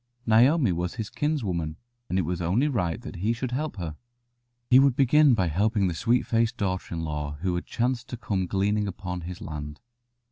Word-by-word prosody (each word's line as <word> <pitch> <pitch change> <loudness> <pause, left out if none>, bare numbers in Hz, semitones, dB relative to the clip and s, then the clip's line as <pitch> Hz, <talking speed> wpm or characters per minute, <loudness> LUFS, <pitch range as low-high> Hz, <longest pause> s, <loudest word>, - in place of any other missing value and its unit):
Naomi 120 - +5
was 90 +1 -2
his 110 -3 -5
kins 150 -2 -1
woman, 85 -5 -2 0.3
and 90 - 0
it 95 - +2
was 90 +2 -3
only 100 - +2
right 95 - -1
that - - -8
he 105 +6 +1
should 125 +1 -4
help 150 +3 -2
her. 85 -5 -5 0.7
He 130 - +7
would 135 -2 +4
begin 140 0 +5
by 95 - +1
helping 100 +5 +1
the 90 - -1
sweet 120 +9 +1
faced 115 +1 +1
daughter 95 -4 -2
in 80 - -3
law 75 -2 -3
who 90 -1 0
had 90 - -3
chanced 125 0 -1
to 125 - -5
come 100 -5 -2
gleaning 105 +2 +1
upon 90 -2 -5
his 90 +1 -7
land. 75 -1 -6
100 Hz, 205 wpm, -26 LUFS, 90-120 Hz, 0.7 s, He